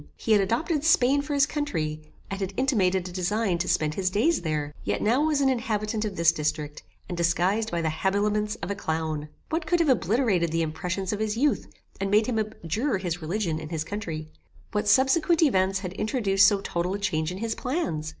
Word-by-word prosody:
He 225 - -3
had 210 -2 +6
adopted 285 - 0
Spain 285 -3 +4
for 290 0 -3
his 280 -1 +5
country, 160 - -3 0.3
and 195 - -3
had 190 0 -3
intimated 190 -9 +1
a - - -8
design 185 +1 0
to 175 - -1
spend 155 -1 +1
his 185 +2 0
days 230 - +2
there, 150 -3 -2
yet - - -1
now 235 +6 +2
was 305 -2 +2
an 270 - +4
inhabitant 220 -3 -1
of 205 -2 -4
this 170 -1 +4
district, 150 -1 -3 0.3
and 175 - -4
disguised 180 +6 +1
by 170 -1 -2
the 160 - +1
habiliments 210 +5 0
of - - -2
a - - +1
clown! 160 -4 -3 0.2
What 325 +2 -1
could 350 - +2
have 330 -3 +3
obliterated 205 -7 +2
the 165 0 +1
impressions 175 +5 -3
of 210 - -3
his 215 0 -1
youth, 290 +4 +1 0.3
and 195 - -1
made 210 +2 +4
him 230 -2 -1
abjure 215 - -2
his 175 -2 -3
religion 165 -1 -2
and 155 -1 -7
his 160 -2 -2
country? 165 -5 -5 0.4
What 210 0 -1
subsequent 290 +8 +4
events 190 -8 +2
had 185 -2 -5
introduced 205 -2 +3
so 205 -2 +2
total 180 0 -2
a - - -4
change 160 -4 -1
in 180 - -6
his 225 +2 -2
plans? 220 - -2
195 Hz, 210 wpm, -26 LUFS, 170-230 Hz, 0.4 s, had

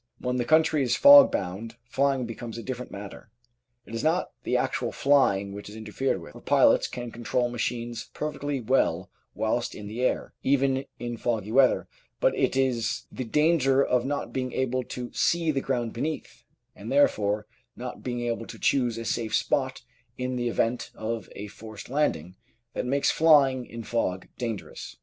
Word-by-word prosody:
When 125 0 -2
the 120 - 0
country 155 +1 +4
is 125 -3 +2
fog 285 -1 +9
bound 100 +6 -4
flying 135 +1 0
becomes 115 0 -7
a 115 - -6
different 125 -1 -6
matter. 100 +1 -9 0.6
It - - -12
is 115 - -3
not 165 +4 +1
the - - 0
actual - - -1
flying 100 -9 +2
which 100 0 -8
is 105 - -10
interfered 110 +2 -2
with, 80 -3 -11
for - - -13
pilots - - +4
can 120 -1 -6
control 120 +1 -1
machines 120 -1 -3
per 150 0 -3
fectly 145 -4 -4
well 95 -8 +1 0.2
whilst - - -1
in 105 - -8
the 110 +4 -5
air, 125 - 0
even 135 0 +2
in 120 -1 -5
foggy 110 -3 -2
weather, 130 +1 +4 0.3
but - - +3
it - - +1
is 125 -3 0
the 130 - -4
danger 140 0 +3
of 125 -1 +1
not 140 +2 -3
being 130 -1 -2
able 130 -1 0
to 125 -1 -6
see 170 -2 +2
the 135 -2 -1
ground 120 -4 -2
beneath, 150 +6 -5 0.3
and - - -8
there 285 0 +6
fore 105 - -2 0.3
not 125 0 -7
being 120 -1 -3
able 115 -1 -3
to - - -9
choose 120 -4 +1
a 115 - -5
safe 115 -1 -1
spot 130 +1 0 0.3
in 125 0 -2
the 120 -1 -1
event 115 +1 -1
of 110 0 -4
a 100 - -6
forced 110 +2 -10
landing, 90 - 0 0.4
that - - -3
makes 140 +2 +2
flying 140 -5 +4
in 115 0 -8
fog 95 -5 -2
dangerous. 115 -5 -5
125 Hz, 180 wpm, -27 LUFS, 115-135 Hz, 0.6 s, fog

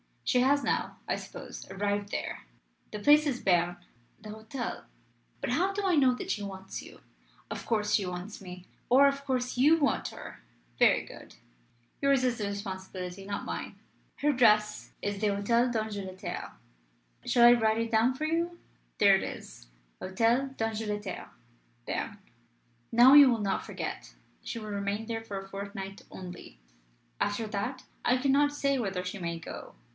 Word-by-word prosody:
She 250 - +2
has 280 +3 +3
now, - - -1
I - - +1
suppose, - - -9
arrived 205 +1 -1
there. - - -4 0.5
The 210 - -5
place 295 +6 +6
is 255 -4 -1
Berne; 175 -1 +2 0.4
the 215 -1 -11
Hotel. 220 +4 -6 0.6
But - - -2
how 365 +9 +1
do 410 +1 -2
I 375 -3 +3
know 260 -4 +4
that - - -4
she 210 - -1
wants 195 -1 -6
you?" - - -14 0.5
"Of - - -5
course 210 -2 0
she 200 - +3
wants 180 +3 -6
me." 180 -1 -9 0.2
"Or 275 +3 +7
of 280 0 -1
course 255 -2 -1
you 300 +6 +6
want 285 -3 +1
her? - - -10 0.4
Very - - +5
good. - - -13 0.7
Yours 275 -2 +3
is 245 -2 +1
the 210 - -2
responsibility, 190 -2 -6
not 200 0 -4
mine. - - -5 0.4
Her 295 - +2
address 215 -6 +3
is 205 -1 -2
the 215 - +1
Hotel 235 +5 +2
d'Angleterre. 205 -5 -4 0.7
Shall 240 -1 +5
I 240 - +10
write 220 -2 +2
it 230 0 -2
down 225 +3 +4
for 305 +3 -2
you? 335 +2 -1 0.4
There - - +7
it - - -4
is. - - -8 0.3
'Hotel 235 +8 +1
d'Angleterre, 215 -2 -3 0.6
Berne.' - - -3 0.7
Now 245 +3 +8
you 285 -2 +10
will 230 -3 +1
not 195 -1 -1
forget. - - -6 0.3
She - - -5
will 215 - -8
remain 200 +1 -2
there 225 -1 -3
for 200 -3 -5
one 195 - -13
fortnight 195 0 -6
only. 175 - -10 0.6
After 205 +2 0
that, 220 +5 -3 0.2
I 245 - +4
cannot 280 +2 +3
say 275 -2 +1
whither 195 -5 -2
she 185 +3 -5
may 170 -1 -3
go. 165 - -9
220 Hz, 165 wpm, -29 LUFS, 200-255 Hz, 0.7 s, I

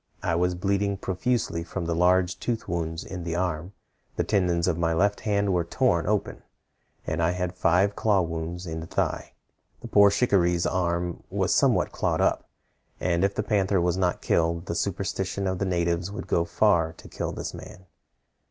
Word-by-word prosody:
I - - 0
was 90 +1 +1
bleeding 100 +2 0
profusely 95 -2 -1
from 85 +1 -5
large 90 +2 +2
tooth 115 -2 -3
wounds 80 -1 -3
in 90 -2 -7
the 85 0 -3
arm; 90 0 -2 0.4
the - - 0
tendons 90 -4 +1
of 90 - +2
my 85 0 0
left 100 +4 +2
hand 100 -2 0
were 90 -1 +2
torn 85 -2 +1
open, 105 -1 -1 0.6
and 80 +1 -2
I 85 +2 +2
had 90 0 -2
five 90 +3 +2
claw 105 -4 +2
wounds 85 +1 -4
in 80 -1 -4
the 80 - -7
thigh. - - -2 0.5
The - - -7
poor 100 0 +6
shikaree's 90 -6 +2
arm 85 -1 -1
was - - 0
somewhat - - +3
clawed - - -1
up, - - +1 0.5
and 85 0 +1
if 100 0 +1
the 105 - -1
panther 100 -2 +1
was 90 0 +1
not 90 -2 0
killed, 85 +1 +1
the 85 - -3
superstition 95 +1 -2
of 95 -1 -1
the 100 - 0
natives 85 0 0
would 100 - -6
go 85 - +1
far 85 -2 +2
to - - -14
kill - - -4
this - - -5
man. 90 - -11
90 Hz, 180 wpm, -26 LUFS, 85-100 Hz, 0.6 s, poor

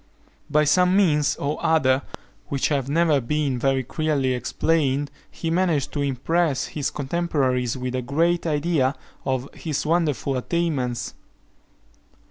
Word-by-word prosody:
By 150 0 +3
some 180 +5 +4
means 150 -7 +3
or 145 +2 -3
other, 135 -5 +3 0.5
which 140 -1 0
have 140 -3 -1
never 155 -2 +3
been 140 0 -1
very 135 0 +1
clearly 140 -1 0
explained, 140 +2 0 0.2
he 165 - -4
managed 165 -5 +1
to 145 - -1
impress 140 +3 0
his 145 -3 -3
contemporaries 135 -5 -1
with 125 0 -4
a 130 - -1
great 165 +7 +1
idea 150 -3 +1 0.3
of 130 0 -1
his 155 -3 -3
wonderful 150 -5 +1
attainments. 130 -5 -1
145 Hz, 125 wpm, -23 LUFS, 130-165 Hz, 0.5 s, some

